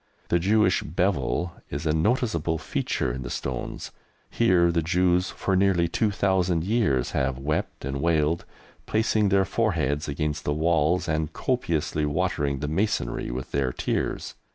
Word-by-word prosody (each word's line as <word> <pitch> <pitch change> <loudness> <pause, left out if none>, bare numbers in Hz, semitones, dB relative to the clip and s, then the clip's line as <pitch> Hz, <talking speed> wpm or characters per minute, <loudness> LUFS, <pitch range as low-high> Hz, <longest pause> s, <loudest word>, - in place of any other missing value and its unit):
The 85 - +3
Jewish 100 +1 +3
"bevel" 90 0 -1 0.2
is 70 +4 -4
a 75 - +2
noticeable 85 - +1
feature 65 -4 -2
in 65 - -5
the - - -5
stones. 65 0 -4 0.4
Here 90 -7 +3
the 85 0 +1
Jews 90 +2 +2
for 95 - -1
nearly 95 -3 +3
two 105 +6 +1
thousand 95 -4 +1
years 95 - +1
have 65 -1 0
wept 70 -1 -3
and 70 0 -3
wailed, 80 0 +1 0.4
placing 110 -1 +2
their 95 0 +3
foreheads 80 - 0
against 75 +1 -2
the 75 - -1
walls 85 +2 +2
and 80 -1 -1
copiously 80 - -1
watering 75 -4 -1
the 75 - -2
masonry 80 - -1
with 65 +1 -5
their 70 -2 0
tears. - - -2
85 Hz, 150 wpm, -25 LUFS, 75-95 Hz, 0.4 s, The